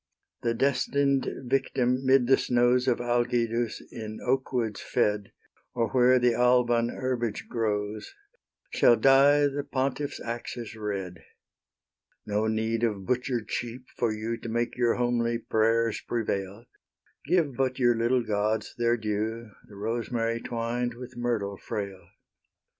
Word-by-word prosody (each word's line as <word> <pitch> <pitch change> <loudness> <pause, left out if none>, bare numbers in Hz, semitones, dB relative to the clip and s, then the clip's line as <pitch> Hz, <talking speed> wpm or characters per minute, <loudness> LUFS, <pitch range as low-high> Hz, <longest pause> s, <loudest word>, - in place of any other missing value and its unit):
The 115 0 0
destined 140 +1 +1 0.2
victim 125 0 +1
'mid 130 -1 +4
the 135 +2 +6
snows 125 +1 +2
Of 125 - +2
Algidus 120 -1 0
in 110 -2 -7
oakwoods 125 -4 -1
fed, 105 -1 0 0.4
Or 115 -2 0
where 130 0 +5
the 125 -1 +3
Alban 120 -1 +3
herbage 120 -4 -3
grows, 105 -2 -2 0.6
Shall 120 - +5
dye 135 +5 +5
the 145 0 0
pontiff's 140 +1 -2
axes 115 -1 -6
red; 100 -5 -5 1.0
No 105 +1 0
need 110 +1 -1
of 105 -4 -1
butcher'd 125 -2 -1
sheep 120 +1 -4
for 120 -2 0
you 110 +2 -3
To 115 - -7
make 120 +1 -1
your 120 -2 +2
homely 120 -1 0
prayers 115 0 +1
prevail; 105 -1 -3 0.6
Give 160 -5 +2
but 130 -1 0
your 120 -2 +3
little 120 +2 +1
gods 110 0 -1
their 120 0 +2
due, 110 +1 -3 0.2
The 105 - -14
rosemary 115 +2 -2
twined 120 0 -2
with 125 +1 -10
myrtle 115 -5 -2
frail. 100 -4 -6
120 Hz, 130 wpm, -27 LUFS, 110-125 Hz, 1.0 s, the